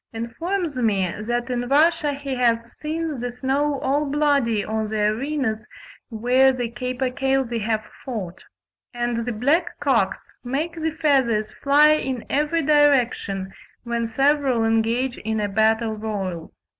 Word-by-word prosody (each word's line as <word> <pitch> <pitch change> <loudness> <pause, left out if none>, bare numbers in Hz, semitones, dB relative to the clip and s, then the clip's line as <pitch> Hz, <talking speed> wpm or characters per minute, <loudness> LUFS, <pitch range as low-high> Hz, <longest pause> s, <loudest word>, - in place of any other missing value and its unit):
Kovalevsky 225 +1 -2
informs 350 -3 -2
me 200 -7 +1
that 240 0 -1
in 245 0 -2
Russia 300 +1 +3
he 275 -1 -5
has 240 -2 +3 0.2
seen 310 -2 -3
the 245 +1 -3
snow 275 +3 -1
all 290 +2 0
bloody 280 -7 +1
on 220 0 -2
the 215 0 -2
arenas 220 +1 -1 0.4
where 250 +4 +3
the 245 -3 -3
capercailzie 255 -1 -1
have 215 0 -1 0.2
fought; 205 -9 -6 0.5
and 240 -1 -2
the - - 0
black 285 +10 0
cocks 240 -10 0
"make 285 +7 -2
the 320 -1 -2
feathers 265 -9 +1
fly 290 +2 +4
in 265 -6 -1
every 300 +3 +1
direction," 250 -10 +2 0.3
when 235 -1 -2
several 270 0 +2
"engage 225 +3 0
in 220 0 -2
a 210 - 0
battle 220 +2 +2
royal." 195 -6 -4
250 Hz, 140 wpm, -23 LUFS, 220-285 Hz, 0.5 s, fly